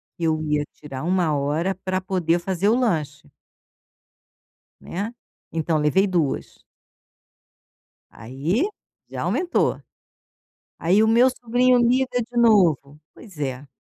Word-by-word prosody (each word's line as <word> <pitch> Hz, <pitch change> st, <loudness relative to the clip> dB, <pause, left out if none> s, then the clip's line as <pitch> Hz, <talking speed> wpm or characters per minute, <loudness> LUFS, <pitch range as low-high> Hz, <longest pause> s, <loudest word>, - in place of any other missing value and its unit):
que 170 Hz, -, -7 dB
eu 155 Hz, -1 st, +1 dB
ia 150 Hz, -1 st, 0 dB
tirar 135 Hz, -1 st, -8 dB
1 175 Hz, -3 st, +1 dB
hora 150 Hz, +7 st, -1 dB
para 185 Hz, 0 st, -1 dB
poder 180 Hz, -3 st, 0 dB
fazer 190 Hz, +2 st, 0 dB
o 225 Hz, -, +4 dB
lanche. 160 Hz, -, -1 dB, 1.5 s
Né, 205 Hz, +6 st, -5 dB, 0.4 s
então 160 Hz, 0 st, 0 dB
levei 155 Hz, +7 st, +2 dB
2. 170 Hz, -7 st, -2 dB, 1.5 s
Aí, 145 Hz, -, -2 dB, 0.4 s
já -, -, -5 dB
aumentou. 355 Hz, -1 st, 0 dB, 1.0 s
Aí 190 Hz, +6 st, +3 dB
o -, -, +3 dB
meu 240 Hz, +3 st, +5 dB
sobrinho 250 Hz, +1 st, +2 dB
liga 250 Hz, +2 st, +3 dB, 0.2 s
de 240 Hz, -, -7 dB
novo. 170 Hz, -, +3 dB
Pois 195 Hz, -9 st, -15 dB
é. 135 Hz, -1 st, -4 dB
180 Hz, 115 wpm, -23 LUFS, 150-225 Hz, 1.5 s, meu